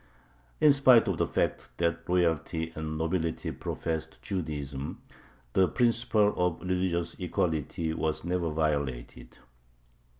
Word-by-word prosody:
In 150 - +7
spite 130 -4 +6
of - - -1
the - - +2
fact - - -1
that 85 0 -1
royalty 80 -2 +1
and 80 0 -4
nobility 80 0 -1
professed 80 -1 -4
Judaism, 75 -7 -4 0.5
the 95 -1 +4
principle 115 -3 +2
of 90 -2 +1
religious 90 -2 -1
equality 80 -2 -1
was 80 0 -2
never 90 -1 0
violated. 70 -6 -2
85 Hz, 110 wpm, -29 LUFS, 80-90 Hz, 0.5 s, In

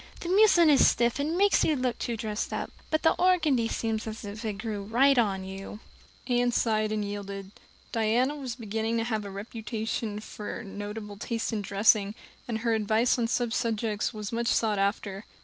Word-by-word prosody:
The 345 - -4
muslin 370 -5 +6
is 280 - +6
stiff, 235 +2 +2
and 310 +4 0
makes 400 +1 +4
you 310 - +2
look 255 -2 -1
too 235 -1 -2
dressed 215 -1 -3
up. - - -3 0.2
But 310 - 0
the 320 - +5
organdy 325 -10 +3
seems 225 -1 -2
as 220 -1 -6
if 205 +3 -7
it 215 -2 -2
grew 205 -1 -5
on 240 -8 +4
you." 195 +2 -8 0.5
Anne 245 -1 +2
sighed 215 -2 +1
and 210 -1 -1
yielded. 200 -1 -6 0.4
Diana 235 +5 +1
was 260 -5 -5
beginning 225 0 -2
to 225 - +1
have 220 -3 -2
a - - -5
reputation 215 +1 -4
for 215 +2 -7
notable 205 0 -7
taste 230 +2 -3
in 215 - -1
dressing, 205 +1 +3 0.3
and 230 -2 -1
her 230 -1 +1
advice 220 +3 +2
on 230 - +1
such 240 -1 0
subjects 220 -3 -1
was 210 -3 -6
much 235 0 -1
sought 220 -4 +2
after. 200 0 -1
225 Hz, 185 wpm, -28 LUFS, 210-245 Hz, 0.5 s, muslin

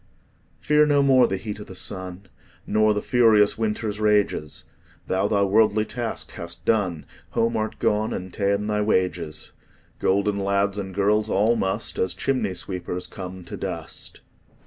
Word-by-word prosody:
Fear 150 0 +4
no 145 -1 +4
more 130 -2 +5
the 95 - -2
heat 105 +1 -6
o' - - -6
the 95 - -11
sun, 95 0 -5 0.4
Nor 110 0 +3
the 105 - -2
furious 110 -4 +4
winter's 110 -1 -2
rages; 105 -8 +1 0.4
Thou 95 +2 +1
thy 100 -1 +2
worldly 105 +1 +3
task 120 0 -5
hast 85 0 -8
done, 95 -8 +1 0.3
Home 115 0 +2
art 110 0 -2
gone, 105 +1 +1
and 95 0 -5
ta'en 100 0 0
thy 105 0 0
wages: 90 -6 -1 0.5
Golden 100 +1 +1
lads 100 +1 0
and 95 -2 -6
girls 105 +2 +2
all 110 +4 +3
must, 95 +1 -2
As 95 -1 0
chimney 110 -2 -1
sweepers, 90 -1 -5
come 95 -2 -8
to 85 - -8
dust. - - -6
105 Hz, 155 wpm, -24 LUFS, 95-110 Hz, 0.5 s, more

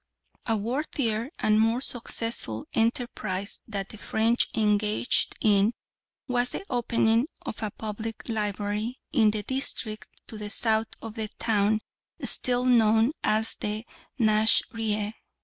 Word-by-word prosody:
A 225 -1 +2
worthier 235 0 -1
and 215 0 +3
more 225 +2 +3
successful 230 - -3
enterprise 220 -4 -1
that 200 -3 -4
the 215 - -10
French 225 +3 +2
engaged 210 +2 +2
in 205 +1 +4 0.5
was 245 -1 +1
the 390 - -5
opening 235 0 +2 0.2
of 220 - -5
a 215 - -1
public 220 +1 -6
library 210 +1 -2
in 225 -7 +5
the 210 0 -2
district 240 -4 -1 0.2
to 220 - -7
the 210 0 -4
south 220 +1 +2 0.2
of 225 -1 -6
the 220 -1 -3
town 215 -1 +2 0.4
still 250 0 +2
known 225 -1 +4
as 220 +1 +2
the 210 +2 -3 0.3
Nasrieh. 215 -1 +2
220 Hz, 125 wpm, -27 LUFS, 210-235 Hz, 0.5 s, in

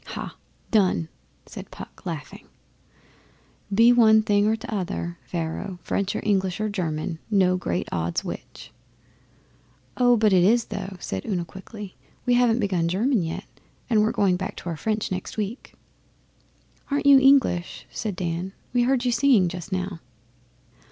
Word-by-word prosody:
'Ha' - - -7 0.4
done!' 185 -6 +2 0.4
said - - -10
Puck, - - -11
laughing. - - -7 1.2
'Be 230 +4 +6
one 220 -2 +6
thing 205 -1 +3
or 220 - +3
t'other, 195 -6 -4
Pharaoh 170 +2 -4
French 200 +3 -1
or - - -2
English 190 -3 0
or 215 0 -1
German 165 -4 -3
no 190 -3 +3
great 90 - -2
odds 85 0 -1
which.' - - -8 1.3
'Oh, 245 -1 +5
but 215 -2 +3
it 180 -2 +5
is, 230 +5 +4
though,' 200 -1 -5
said 95 - -4
Una 175 -3 -1
quickly. 190 +2 -10 0.3
'We 245 - +3
haven't 240 -1 +3
begun 185 -6 0
German 215 +6 +1
yet, 165 -1 -4 0.5
and 220 - +5
and - - +5
we're 215 +1 +2
going 190 -5 +2
back 190 +1 -5
to 175 - -6
our 165 - -3
French 215 +7 -2
next 185 +3 -5
week.' 215 +4 -5 1.1
'Aren't 285 0 0
you 280 -1 +8
English?' 265 -10 +3
said 215 -4 -4
Dan. 175 +1 -3 0.2
'We 245 - +3
heard 255 0 +2
you 245 - +2
singing 235 -6 +4
just 180 +2 -7
now. 185 -1 -3
200 Hz, 155 wpm, -24 LUFS, 180-225 Hz, 1.3 s, you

